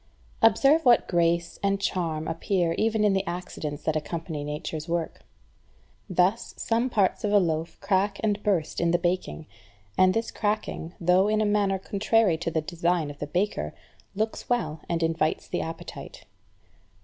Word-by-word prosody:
2. 225 - +9
Observe 275 +9 +4
what 245 -2 +5
grace 170 -1 +1
and 200 0 +1
charm 165 -5 -2
appear 170 +1 0
even 220 +3 +1
in 205 -2 +4
the 190 0 +1
accidents 170 -4 -5
that 155 - 0
accompany 155 -1 -4
Nature's 150 +2 -5
work. 170 -1 -2 0.9
Thus 185 +5 +1
some 235 +3 0
parts 205 -2 +1
of 205 - 0
a 205 - +6
loaf 165 -3 -1
crack 195 0 +1
and 210 -1 +1
burst 185 -8 0
in 170 - +2
the 175 - +3
baking; 175 - -2 0.5
and 185 0 +5
this 225 0 -1
cracking, 205 -5 -2
though 180 +3 +4
in 215 0 +2
a 215 - +2
manner 205 -2 +2
contrary 200 -2 +1
to - - -2
the 160 -1 0
design 170 -1 -1
of 145 - -14
the 145 - -4
baker, 175 - -1 0.4
looks 220 +2 -3
well 160 -11 0
and 170 -1 0
invites 160 -1 0
the - - -2
appetite. 165 0 -8
180 Hz, 165 wpm, -26 LUFS, 165-205 Hz, 0.9 s, 2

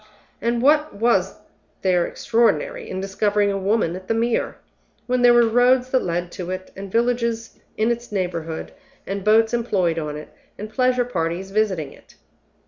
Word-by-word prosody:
and 235 +1 0
what 300 -2 +3
was 200 -4 +1 0.5
there 180 -2 +2
extraordinary 475 - 0
in 185 - -4
discovering 205 +1 +1
a 195 - -1
woman 195 -3 0
at 185 0 -9
the 225 - 0
Mere, 230 +1 0 0.5
when 250 0 0
there 245 0 +7
were 240 0 +6
roads 250 +2 +3
that 260 - +3
led 175 0 -2
to 180 -1 -6
it, 185 0 -5
and 195 0 -8
villages 235 0 -1 0.2
in 220 +2 +2
its 235 0 -4
neighborhood, 170 -5 -3 0.3
and 195 0 -4
boats 225 +2 +4
employed 190 -8 0
on 150 -1 -4
it, 150 - -10 0.3
and 215 +1 -7
pleasure 250 0 +2
parties 180 -3 -3
visiting 190 -9 0
it? - - -20
215 Hz, 165 wpm, -22 LUFS, 185-240 Hz, 0.5 s, there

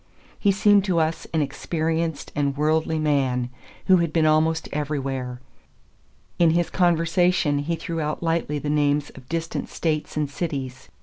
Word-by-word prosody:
He 200 - +3
seemed 205 0 +4
to 185 -4 +1
us 160 +1 -1
an 160 -2 +2
experienced 160 +2 -2
and 140 -1 0
worldly 160 +1 +1
man 135 -5 0 0.3
who 190 -1 +6
had 170 -2 0
been 160 -1 +2
almost 160 +1 +2
everywhere; 135 -4 -3 1.0
in 170 -1 +5
his 170 +1 +1
conversation 175 -3 +2
he 160 +4 -1
threw 165 0 -4
out 150 +2 -3
lightly 165 -3 0
the 145 - -5
names 145 -1 +1
of 130 -1 -15
distant 165 0 -3
States 155 -2 -2
and 150 -1 +1
cities. 135 - -5
155 Hz, 150 wpm, -24 LUFS, 145-165 Hz, 1.0 s, who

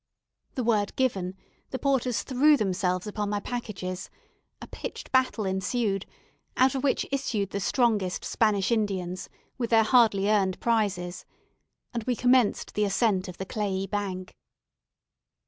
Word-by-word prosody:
The 255 - -1
word 215 -3 +1
given, 190 -8 0 0.3
the 260 - -3
porters 260 -4 0
threw 285 +3 +4
themselves 185 -3 0
upon 210 -1 -3
my 205 0 0
packages; 200 -6 -5 0.5
a - - -8
pitched - - -7
battle 255 -5 +2
ensued, 195 +1 -1 0.5
out 260 0 +4
of 265 - -3
which 280 - +1
issued 230 -8 -1
the 200 - -2
strongest 210 -4 +1
Spanish 210 -2 +1
Indians, 190 -5 -1 0.3
with 235 -2 -1
their 225 -1 +5
hardly 215 -4 +4
earned 195 -3 +2
prizes, 200 -6 0 0.7
and 235 -2 -2
we 250 - +1
commenced 245 -2 +2
the 210 - +1
ascent 195 -2 +1
of 180 - -8
the 190 - -4
clayey 195 -2 -2
bank. 195 -3 -4
210 Hz, 140 wpm, -27 LUFS, 190-245 Hz, 0.7 s, their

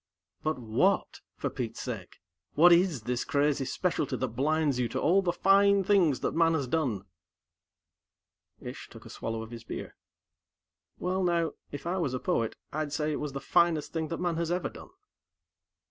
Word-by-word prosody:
"But 155 -1 -1
what, 115 -3 +1
for - - -3
Pete's 115 -4 -4
sake? 110 -8 -6 0.3
What 175 +3 +7
is 170 - +4
this 125 +1 -1
crazy 145 -1 +1
specialty 150 +1 -1
that 130 - -2
blinds 145 +2 +1
you 125 - +1
to 130 +3 -2
all 180 +8 +4
the 180 -2 +1
fine 195 +2 +4
things 180 -8 +3
that - - 0
man 165 0 +3
has 140 -4 -1
done?" 125 -9 0 1.6
Ish - - -8
took - - -13
a - - -10
swallow 115 0 -4
of 110 - -11
his 115 -1 -8
beer. - - -7 1.0
"Well, 185 +1 -1
now, 170 -3 +1 0.2
if 145 - -7
I 175 +2 -1
was 140 -7 -1
a - - -2
poet, 115 -2 0 0.2
I'd 155 -1 -2
say 150 +1 -1
it 150 - -2
was 150 -2 -4
the 135 - -3
finest 170 0 +2
thing 160 -1 -1
that 165 - -4
man 175 -2 -1
has 165 -1 -1
ever 180 +1 -1
done." - - -12
155 Hz, 180 wpm, -29 LUFS, 125-170 Hz, 1.6 s, What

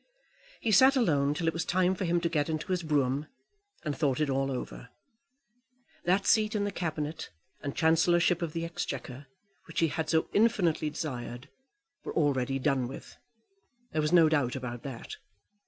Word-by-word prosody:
He 225 - 0
sat 260 +7 +6
alone 145 - +2
till 165 - -2
it 165 - +1
was 165 - -2
time 185 0 +2
for 190 0 -3
him 175 0 +2
to 170 - +1
get 155 -2 0
into 160 +4 -3
his 180 -1 +1
brougham, 145 -2 0 0.6
and 150 -2 -1
thought 135 -2 0
it 150 -2 +1
all 135 +1 0
over. 125 -1 -6 1.2
That 190 +3 +2
seat 215 0 +3
in 205 - +1
the 205 - -1
Cabinet 155 -4 -4 0.3
and 140 - -4
Chancellorship 170 +2 +3
of 165 -3 -3
the 165 0 -2
Exchequer, 140 -4 -5 0.4
which 165 - -3
he 165 - +3
had 155 +1 -3
so 160 -1 +2
infinitely 180 -8 +2
desired, 125 -5 -6 0.5
were - - -6
already 135 -4 +1
done 135 -2 0
with. 135 - -10 0.8
There 155 - 0
was 150 +1 0
no 170 -2 +7
doubt 145 -5 +1
about 120 -2 -5
that. 130 -5 -7
155 Hz, 170 wpm, -29 LUFS, 140-175 Hz, 1.2 s, no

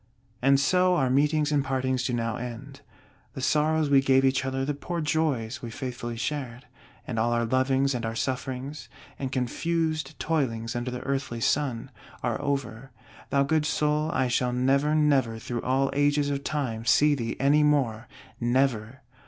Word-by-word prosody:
And 135 +1 +4
so 180 +5 +3
our 130 -6 +1
meetings 150 +2 +2
and 145 -2 +2
our 135 - -8
partings 130 -1 0
do 125 - -1
now 115 -2 -1
end! 125 +3 -8 0.5
The - - -7
sorrows 150 +3 +2
we 140 -1 +5
gave 135 0 +3
each 135 0 +2
other; 135 0 -2
the 145 - -1
poor 170 +4 -4
joys 145 -7 -1
we 120 - -6
faithfully 120 -1 -5
shared, 130 -2 -4 0.4
and 115 -3 -3
all 120 +1 +1
our 120 0 +1
lovings 130 +3 +1
and 120 -1 -3
our 115 0 -3
sufferings, 135 +2 -4 0.3
and 135 -2 -3
confused 155 +3 -1
toilings 120 -7 -1
under 120 +1 -2
the 125 0 -5
earthly 135 -4 -3
Sun, 125 -1 0 0.3
are - - -1
over. 135 -3 -3 0.4
Thou 140 0 +3
good 150 +1 +1
soul, 150 +1 +1
I 130 -5 +1
shall 125 0 0
never, 140 +4 +2
never 135 -7 +2
through 120 +1 -4
all 135 +1 +1
ages 145 0 +2
of 140 0 -3
Time, 130 -7 -2
see 150 +5 +4
thee 115 -5 -3
any 145 +3 +4
more! 135 -7 +1 0.3
NEVER! 125 0 0
135 Hz, 170 wpm, -26 LUFS, 125-145 Hz, 0.5 s, we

